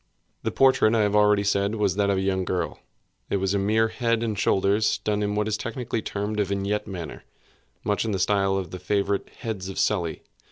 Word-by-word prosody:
The - - -1
portrait, 130 -4 +4
I 110 - +3
have 105 0 +1
already 105 -1 +4
said, 100 +1 +1
was 105 -4 +1
that 100 0 +1
of 100 - +2
a - - 0
young 95 -1 0
girl. 90 -2 -2 0.5
It - - +1
was 95 0 0
a 100 - +1
mere 110 +3 +2
head 115 -1 0
and 110 -2 -1
shoulders, 100 +2 +2
done 105 -1 -1
in 105 0 -1
what 105 0 0
is 110 -1 0
technically 115 -1 -3
termed 105 +1 -3
a - - +4
vignette 100 +2 -2
manner; 85 -6 -7 0.6
much 105 -1 0
in 115 - -2
the 100 - 0
style 95 0 +2
of 95 -4 -4
the 90 - -6
favorite 100 +1 -1
heads 100 -5 -5
of 95 - -7
Sully. 85 -6 0
100 Hz, 215 wpm, -25 LUFS, 95-105 Hz, 0.6 s, portrait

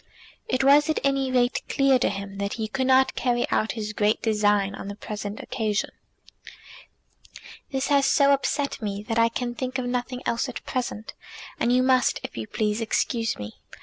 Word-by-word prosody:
It 255 +1 +1
was 290 +3 +5
at 315 - +1
any 275 -1 +1
rate 245 -1 +2
clear 275 -2 +3
to - - +2
him 195 0 -6
that 200 0 -2
he 220 -2 -3
could 260 +4 -1
not 265 0 +4
carry 240 -1 0
out 220 - +1
his 210 -2 -4
great 210 +1 +1
design 205 -2 +2
on 200 - -7
the 200 - -6
present 210 0 -6
occasion. 215 -4 -2 1.8
"This 270 0 -2
has 280 -1 +4
so 280 -1 +4
upset 280 0 -1
me 205 -1 -4
that 230 -1 0
I 230 0 +4
can 240 +1 -3
think 255 +2 -3
of 255 - -2
nothing 250 +1 -3
else 235 +3 0
at 255 - -8
present, 240 -4 -4 0.5
and 240 - +2
you 250 +1 +4
must, 255 -1 +3
if - - -7
you 110 -1 -5
please, 210 +1 -1
excuse 225 0 0
me. 105 +1 -8
240 Hz, 185 wpm, -25 LUFS, 210-260 Hz, 1.8 s, was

